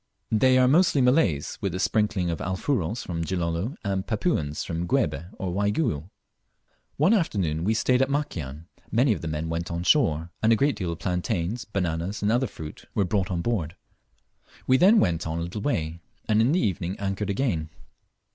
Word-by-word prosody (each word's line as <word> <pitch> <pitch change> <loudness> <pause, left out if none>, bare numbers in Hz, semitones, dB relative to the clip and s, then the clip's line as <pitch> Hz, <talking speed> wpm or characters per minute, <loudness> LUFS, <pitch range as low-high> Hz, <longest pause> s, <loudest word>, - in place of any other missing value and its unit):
They 130 +4 +4
are 130 0 +5
mostly 155 +1 +4
Malays, 125 - +2
with 95 -3 -2
a - - -3
sprinkling 105 -3 +1
of 85 - -3
Alfuros 95 - -1
from 85 -2 -3
Gilolo, 85 - -2
and 95 -1 -1
Papuans 100 - -1
from 85 0 -3
Guebe 80 -2 0
or 90 -2 -3
Waigiou. 100 - 0 0.9
One 160 +10 +4
afternoon 95 - 0
we 110 +4 +1
stayed 125 +3 +2
at 135 - +2
Makian; 85 - -3 0.3
many 120 +1 +3
of 90 - -6
the 80 - -4
men 80 +1 -3
went 80 +1 -3
on 85 0 -3
shore, 85 - +2
and 110 - +4
a - - +6
great 140 +5 +2
deal 90 -3 -3
of 85 - -5
plantains, 90 +5 -2
bananas, 95 -1 -2
and 105 - +2
other 125 +3 +2
fruits 80 -6 -9
were 100 - +2
brought 95 -1 0
on 85 -2 -2
board. 90 -9 -1 0.9
We 130 - +4
then 205 - +6
went 85 -2 +1
on 80 +1 -2
a 85 - -2
little 90 +5 -5
way, 85 - -1 0.3
and 110 0 +3
in 120 +4 +3
the 175 - +3
evening 90 - -1
anchored 100 0 -2
again. 95 - -1
95 Hz, 185 wpm, -26 LUFS, 85-120 Hz, 0.9 s, a